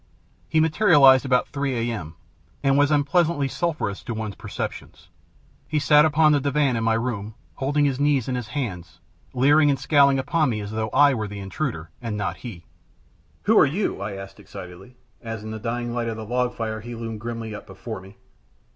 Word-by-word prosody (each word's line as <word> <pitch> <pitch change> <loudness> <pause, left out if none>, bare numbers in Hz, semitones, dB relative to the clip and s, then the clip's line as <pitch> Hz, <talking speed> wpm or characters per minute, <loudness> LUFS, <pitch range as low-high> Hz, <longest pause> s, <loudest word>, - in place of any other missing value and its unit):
He 160 - +2
materialized 155 -6 +5
about 125 -2 +2
3 130 -5 -2
A.M. 85 -8 -6 0.5
and 135 -1 +3
was 145 0 +4
unpleasantly 150 0 +2
sulphurous 155 - -2
to 120 - -4
one's 110 -2 -4
perceptions. - - -7 0.6
He 155 - -1
sat 150 0 +5
upon 155 0 +4
the 145 - +4
divan 140 -2 +1
in 115 - -1
my 115 0 +2
room, 110 -3 -3 0.2
holding 145 +2 0
his 135 -2 0
knees 145 -4 +2
in 130 - -2
his 125 -3 -3
hands, 95 - -5 0.4
leering 145 +4 +5
and 140 - +2
scowling 140 0 +4
upon 145 +3 +1
me 110 -3 -2
as 105 0 -6
though 110 0 -2
I 145 +4 +5
were 110 -4 -2
the 105 0 -8
intruder, 95 - -4
and 115 -3 -4
not 105 -2 -3
he. 100 -9 -9 0.8
"Who 220 - +3
are - - +7
you?" 165 - -2
I 100 0 -4
asked, 95 0 -9
excitedly, 95 +6 -11 0.3
as 115 -2 -6
in 110 - -6
the 110 - -5
dying 120 +1 -3
light 120 -1 -2
of 115 -1 -3
the 110 - -6
log 125 +2 -1
fire 110 -1 -4
he 120 +2 -7
loomed 115 -1 -6
grimly 115 -1 -5
up 105 - -9
before 100 +2 -7
me. 95 +2 -15
120 Hz, 195 wpm, -24 LUFS, 110-145 Hz, 0.8 s, are